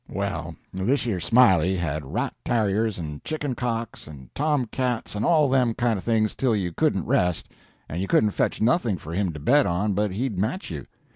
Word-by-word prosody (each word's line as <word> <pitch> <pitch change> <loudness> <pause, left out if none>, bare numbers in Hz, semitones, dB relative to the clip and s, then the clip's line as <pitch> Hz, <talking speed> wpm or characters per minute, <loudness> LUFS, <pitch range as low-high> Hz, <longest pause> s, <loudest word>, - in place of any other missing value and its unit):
"Well, - - -3 0.2
thish 120 +10 0
yer 105 -6 -1
Smiley 95 -2 +4
had 80 -4 -2
rat - - -1
tarriers, 110 -1 +1
and 75 -4 -6
chicken 145 -4 -3
cocks, 115 -2 -4
and 70 -5 -12
tomcats 130 -5 -1
and 105 +1 -2
all 155 -4 +4
them 130 -4 +2
kind 120 -2 +1
of - - -10
things, 110 -2 +1
till 125 -4 +1
you 95 -4 -1
couldn't - - +1
rest, 90 -2 +1 0.4
and 85 +4 -4
you 95 - -2
couldn't 105 +1 +3
fetch - - -1
nothing 120 - +2
for 80 +1 -8
him 95 0 0
to 75 - -8
bet 140 - +4
on 100 +4 0
but 105 +2 +1
he'd 110 -2 -2
match 145 - -2
you. - - -6
110 Hz, 195 wpm, -25 LUFS, 90-125 Hz, 0.4 s, Smiley